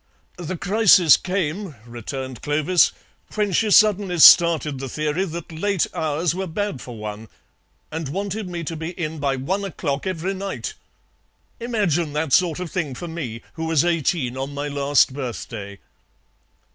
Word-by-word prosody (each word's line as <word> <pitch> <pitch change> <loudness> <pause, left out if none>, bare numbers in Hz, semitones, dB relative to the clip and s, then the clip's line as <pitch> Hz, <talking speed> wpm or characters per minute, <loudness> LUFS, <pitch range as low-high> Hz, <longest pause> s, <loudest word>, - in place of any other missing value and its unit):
"The 175 +1 -4
crisis 190 - +6
came," 185 -2 -3
returned 125 +2 -7
Clovis, 155 +4 +3 0.4
"when 210 -2 0
she 215 +4 +2
suddenly 200 -3 +4
started 160 -4 +7
the 135 0 -5
theory 155 +7 -1
that 170 -2 -7
late 190 +3 0
hours 155 +1 -1
were 190 +1 -3
bad 195 -3 -3
for 120 -2 -9
one, 105 +1 -7 0.6
and 160 -2 -4
wanted 200 +4 -4
me 170 -1 -5
to 165 +1 -4
be 160 +1 -5
in 160 -2 -3
by 140 -1 0
one 185 +10 -2
o'clock 150 -6 -3
every 185 +1 -2
night. 195 - -5 0.9
Imagine 190 -10 0
that 150 -1 -1
sort 180 -3 +3
of 180 -3 -5
thing 155 -8 -3
for 175 - -6
me, 135 -9 -6
who 160 - -5
was 160 -1 +2
eighteen 160 -6 0
on 135 +2 -4
my 145 +1 -3
last 140 -1 +2
birthday." 115 -6 -6
160 Hz, 155 wpm, -22 LUFS, 140-185 Hz, 0.9 s, started